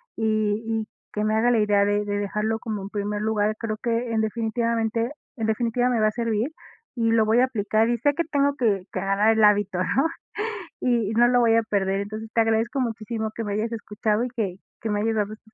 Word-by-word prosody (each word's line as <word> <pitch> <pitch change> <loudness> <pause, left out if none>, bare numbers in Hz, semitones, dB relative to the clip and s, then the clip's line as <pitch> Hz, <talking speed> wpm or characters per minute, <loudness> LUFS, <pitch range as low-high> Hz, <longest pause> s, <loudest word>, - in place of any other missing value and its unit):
y 215 -1 0
y 225 -1 -1 0.2
que 210 - -2
me 215 0 +1
haga 235 +2 +3
la 240 - +3
idea 205 -1 +3
de 205 0 +1
de 205 0 -1
dejarlo 210 +2 -1
como, 215 -5 -4
en 195 - -6
primer 205 0 -3
lugar, 215 -1 +1
creo 215 -2 -3
que 235 0 -1
en 220 - +2
definitivamente 230 +1 -1 0.2
en 225 -2 -2
definitiva, 235 +2 +1
me 240 -3 +1
va 215 - +4
a 215 - +1
servir 230 +3 -1 0.4
y 230 -1 +1
lo 225 -1 +4
voy 220 +2 +3
a 255 - +6
aplicar, 220 -2 +1
y 240 - +1
sé 290 +4 +2
que 335 +4 0
tengo 285 -2 +1
que 210 -8 +1
que 185 - -2
agarrar 200 +3 +3
el 220 - +4
hábito, 205 -3 +3
¿no? 265 - +2 0.7
Y 230 -4 +1
no 240 +2 +5
lo 245 0 +4
voy 230 -2 +4
a 230 - +3
perder, 195 -2 0
entonces 215 +2 -6
te 230 - +4
agradezco 225 +4 +1
muchísimo 220 -1 -3
que 230 - -3
me 205 - -2
hayas 220 +3 -1
escuchado 215 0 -1
y - - -4
que 215 -7 -3 0.3
que 225 - -3
me 205 0 0
hayas 225 +1 0
dado 210 0 -1
estos 220 0 -17
220 Hz, 230 wpm, -24 LUFS, 210-230 Hz, 0.7 s, a